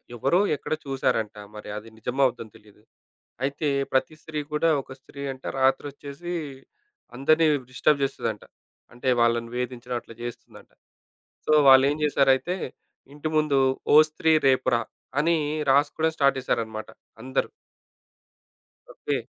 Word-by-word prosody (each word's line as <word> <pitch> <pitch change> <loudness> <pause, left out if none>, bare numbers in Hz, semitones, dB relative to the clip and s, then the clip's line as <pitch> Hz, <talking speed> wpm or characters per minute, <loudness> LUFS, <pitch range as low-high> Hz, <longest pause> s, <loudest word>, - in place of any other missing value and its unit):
ఎవరో 135 - +2 0.2
ఎక్కడొ 155 - -3
చూసారంట. 115 -5 -1 0.2
మరి 105 - -9
అది 110 +2 -9
నిజమా 125 +4 -1
అబద్దమో 115 -4 -3
తెలీదు. 105 0 -22 0.6
అయితే 145 +2 -1 0.2
ప్రతి 135 +4 +1
స్త్రీ 155 -1 -6
కూడా, 160 +2 +2
ఒక 130 - -12
స్త్రీ 140 +1 -13
అంట 130 - -14 0.2
రాత్రి 135 +2 +2
ఒచ్చేసి 145 +5 -8 0.8
అందరిని 155 +4 +3 0.2
డిస్టర్బ్ 140 +2 +2
చేస్తదంట. 115 -5 -3 0.5
అంటే 125 +2 -4
వాళ్ళని 115 0 +2
వేధించిటం 125 0 -4
అట్ల - - -14
జేస్తుందంట. 120 0 -9 0.8
సో 155 - +2 0.2
వాళ్ళేం 135 +2 +7
జేశారైతే 140 +5 +2 0.6
ఇంటి 150 +1 -4
ముందు, 150 -3 +3 0.3
'ఓ - - +8
స్త్రీ 160 +1 +1 0.2
రేపు 130 -1 +2
రా!' 115 - -1 0.4
అని 165 +2 +3 0.4
రాసుకోవడం 150 +3 +2
స్టార్ట్ 140 -1 +3
చేసారన్నమాట 110 -3 -3 0.4
అందరూ. 130 +1 -1 1.5
ఓకే. - - -2
135 Hz, 125 wpm, -25 LUFS, 120-150 Hz, 1.5 s, ఓ